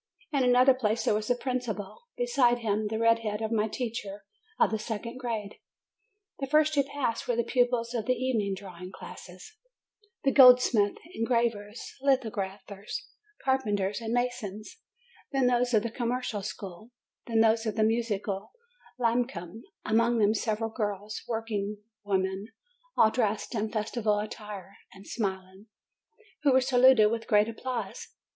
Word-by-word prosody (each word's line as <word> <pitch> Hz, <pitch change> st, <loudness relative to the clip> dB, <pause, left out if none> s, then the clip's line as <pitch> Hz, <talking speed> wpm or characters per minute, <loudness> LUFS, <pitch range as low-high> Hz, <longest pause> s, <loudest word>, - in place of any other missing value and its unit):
In 280 Hz, -3 st, +2 dB
another 250 Hz, +1 st, +6 dB
place 230 Hz, -3 st, 0 dB
there -, -, +3 dB
was 215 Hz, 0 st, -1 dB
the 245 Hz, -, +2 dB
principal; 245 Hz, -, -4 dB
behind 275 Hz, -, +3 dB
him, 215 Hz, -1 st, 0 dB
the 220 Hz, +1 st, -2 dB
red 230 Hz, 0 st, +4 dB
head 210 Hz, -2 st, -3 dB
of 220 Hz, 0 st, -3 dB
my 220 Hz, -1 st, +2 dB
teacher 215 Hz, -4 st, -5 dB, 0.3 s
of -, -, +4 dB
the 220 Hz, -, -1 dB
second 230 Hz, +3 st, -5 dB
grade. 220 Hz, -5 st, -4 dB, 0.8 s
The 275 Hz, -, -2 dB
first 305 Hz, +2 st, +3 dB
to 285 Hz, -, +4 dB
pass 275 Hz, -4 st, -2 dB
were 245 Hz, -, +1 dB
the 235 Hz, -, +1 dB
pupils 245 Hz, -2 st, +1 dB
of 230 Hz, -2 st, -2 dB
the 255 Hz, -, +3 dB
evening 225 Hz, -7 st, 0 dB
drawing 185 Hz, -1 st, -9 dB
classes 185 Hz, -, -11 dB, 0.7 s
the 275 Hz, -, +3 dB
goldsmiths, 250 Hz, -6 st, +6 dB, 0.2 s
engravers, 230 Hz, -, -1 dB
lithog 265 Hz, -5 st, +2 dB
raphers, 195 Hz, +1 st, -6 dB, 0.4 s
carpenters, 210 Hz, -6 st, 0 dB
and 225 Hz, -1 st, -4 dB
masons; 240 Hz, -, -3 dB, 0.5 s
then 270 Hz, -3 st, +2 dB
those 245 Hz, 0 st, +2 dB
of 220 Hz, -3 st, +3 dB
the 235 Hz, -, -3 dB
commercial 240 Hz, -3 st, -2 dB
school; 195 Hz, +1 st, -7 dB, 0.4 s
then 225 Hz, -2 st, +3 dB
those 225 Hz, 0 st, +3 dB
of 215 Hz, -, -2 dB
the 220 Hz, -, +2 dB
Musical 215 Hz, -3 st, -1 dB, 0.4 s
Lyceum, 230 Hz, -5 st, -1 dB, 0.2 s
among 230 Hz, +2 st, +3 dB
them 210 Hz, -1 st, +4 dB
several 220 Hz, 0 st, -1 dB
girls, 210 Hz, -1 st, -3 dB
workingwomen, 205 Hz, -3 st, -3 dB, 0.5 s
all 220 Hz, -, +6 dB
dressed 220 Hz, -2 st, -1 dB
in 215 Hz, -1 st, -2 dB
festival 215 Hz, -1 st, 0 dB
attires 210 Hz, -2 st, -7 dB, 0.2 s
an 195 Hz, +1 st, -13 dB
d -, -, -14 dB
smiling, 190 Hz, -1 st, -4 dB, 0.7 s
who 290 Hz, -3 st, +4 dB
were 260 Hz, -, +6 dB
saluted 255 Hz, -4 st, +5 dB
with 230 Hz, 0 st, -3 dB
great 210 Hz, 0 st, +4 dB
applause. 230 Hz, -2 st, -5 dB
225 Hz, 150 wpm, -28 LUFS, 205-245 Hz, 0.8 s, another